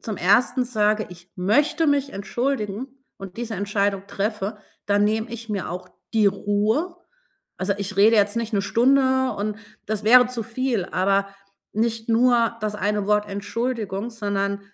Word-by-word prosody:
zum 215 -4 -5
1. 240 +7 +3
sage, 215 -3 +1
ich 175 +1 -14
möchte 290 - +2
mich 285 -1 +1
entschuldigen 230 +2 -2 0.3
und 195 0 -9
diese 235 -1 -4
Entscheidung 200 0 -1
treffe, 210 +1 -3 0.3
dann 205 0 +3
nehme 220 +2 0
ich 230 -1 -8
mir 200 -3 -3
auch 180 +1 -6 0.2
die 220 -2 +4
Ruhe. 210 - 0 0.6
Also, 190 +1 -1
ich 200 -1 -5
rede 220 +3 +6
jetzt 205 +2 +2
nicht 230 0 -2
'ne 200 -2 +1
Stunde 260 +4 +3
und 210 +1 -2 0.3
das 215 0 -3
wäre 245 +2 +7
zu 240 -3 -3
viel, 235 -4 -2
aber 195 +2 +1 0.4
nicht 225 +1 -1
nur 235 0 +3
das 210 -1 -2
eine 205 0 -1
Wort 210 0 +2
Entschuldigung, 210 +1 -3
sondern 200 -2 -2
210 Hz, 155 wpm, -23 LUFS, 200-235 Hz, 0.6 s, wäre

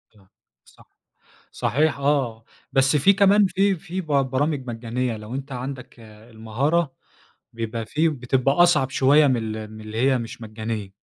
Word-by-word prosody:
آه، 95 -2 -24 0.4
صح. - - -21 0.7
صحيح، 150 +4 0
آه. 135 -6 0 0.3
بس 135 +2 +3
في 190 +8 +5
كمان، 200 +1 +4
في 195 +2 +1
في 185 +1 -6
ب 175 - -10
برامج 140 0 0
مجانية 120 0 -3
لو 105 +3 -8
أنت 135 +1 -6
عَندك 125 -1 -7
المهارة، 115 +8 -3 0.6
بيبقى 115 -1 -4
فيه 155 +3 +1
بتبقى 130 -1 0
أصعب 155 -6 +4
شوية 140 +3 +4
من 130 -3 +2 0.2
ال 110 -1 -7
من 110 - -10
اللي 110 +1 -7
هي 130 0 +3
مش 115 0 -7
مجانية. 110 -2 -5
130 Hz, 150 wpm, -23 LUFS, 115-150 Hz, 0.7 s, في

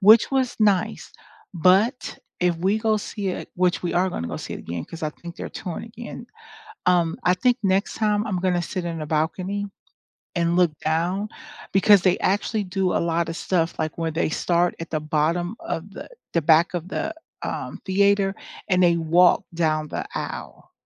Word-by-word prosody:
which 215 +3 +7
was 260 -2 +1
nice 205 -4 +1 0.4
but 190 - +2 0.2
if 175 -1 +2
we 190 +6 +1
go 220 -1 +2
see 205 -1 -4
it, 180 - -4
which 180 0 +1
we 175 - -1
are 185 +2 +3
gonna 85 - -4
go - - -4
see - - -6
it - - -6
again 85 -1 -5
'cause 165 - -10
I 155 - 0
think 170 +3 -11
they're - - -5
touring 175 -3 -6
again, 235 +1 -9 0.6
um, 175 -2 +3
I 180 - +5
think 245 +6 +2
next 195 +1 +1
time 210 -1 +1
I'm 190 -4 -1
gonna 180 -1 +1
sit 180 +1 -4
in 165 -1 -3
the 155 - -4
balcony 180 +6 -1 0.7
and 170 0 +1
look 180 -3 +4
down 175 +6 0 0.5
because 195 0 +6
they 185 -1 +3
actually 205 +2 0
do 190 -1 -1
a - - +2
lot 170 0 0
of 165 - -4
stuff, 170 -2 0
like, 155 -1 -2
where 165 -1 -1
they 160 0 0
start 175 +2 +1
at 165 - -6
the 155 - -1
bottom 165 +5 0
of 180 +5 -5
the - - -9 0.3
the 170 - +2
back 160 +3 +4
of 175 -1 -3
the, - - -3 0.3
um, - - -4
theater 200 0 +3 0.4
and 180 -1 +3
they 170 -1 +5
walk 170 +2 +4
down 155 -2 0
the - - -3
aisle - - -6
180 Hz, 190 wpm, -24 LUFS, 165-200 Hz, 0.7 s, which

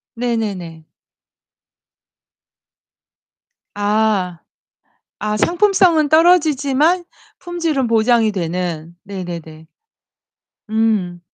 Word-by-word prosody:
네네네. 205 -9 -3 2.9
아. 205 -4 0 0.8
아 210 0 -1
상품성은 350 - +3
떨어지지만 315 0 +3 0.4
품질은 335 -7 -2
보장이 225 -1 +2
되는. 170 -2 -4
네네네. 170 -5 -8 1.0
음. 215 -5 0
220 Hz, 140 characters per minute, -18 LUFS, 180-300 Hz, 2.9 s, 상품성은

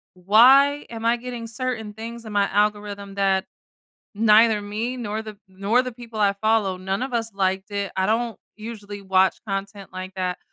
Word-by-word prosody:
why 260 +10 +5
am 230 -1 -6
I 235 - +4
getting 240 -1 -6
certain 225 -3 -4
things 230 +2 -8
in 215 - -7
my 200 -1 +3
algorithm 205 -1 -1
that, 195 -1 +1 0.7
neither 215 0 +5
me 220 +5 -3
nor 220 -3 -4
the 215 -2 -9
nor 200 +6 +1
the 255 -1 -5
people 230 -2 -10
I 200 -1 +4
follow, 210 -2 +1
none 190 +3 -3
of 260 -1 -4
us 225 -1 -1
liked 190 +1 -1
it, 200 -1 -3
I 190 0 +1
don't, 225 0 0 0.2
usually 210 -2 -8
watch 190 0 +3
content 195 0 -5
like 185 0 -7
that, 180 -1 -2
210 Hz, 175 wpm, -23 LUFS, 195-230 Hz, 0.7 s, why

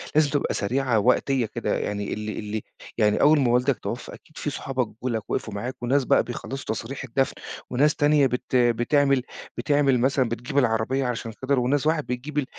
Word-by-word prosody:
لازم 155 -1 +4
تبقى 145 0 0
سريعة 120 +1 +1
وقتية 125 +2 +2
كده، - - -2
يعني 105 0 -3
ال 105 0 -5
ال 110 - -1 0.4
يعني 105 -1 +3
أول 150 0 +6
ما 125 -3 +2
والدك 125 +2 +2
توفى 120 - -5
أكيد 155 - -16
في 150 - -2
صحابك 130 -3 -2
جُم 125 +4 -6
لك 110 -3 -3
وقفوا 110 - -2
معاك، 120 +6 -4
وناس 135 +3 +2
بقى - - +4
بيخلَّصوا 135 +2 -6
تصاريح 130 +5 -6
الدفن، 135 +2 0 0.4
وناس 145 +5 +2
تانية 145 -2 +4
بت 125 +1 -3
بتعمل 125 +3 +3 0.3
بتعمل 140 -4 +2
مثلًا 130 -1 +2
بتجيب 125 +4 -4
العربية 125 +1 +1
عشان 115 -2 -3
خاطر 130 0 +1
وناس 140 +4 +1
راحت 155 -1 +2
بتجيب 140 +3 -3
130 Hz, 180 wpm, -25 LUFS, 120-140 Hz, 0.4 s, أول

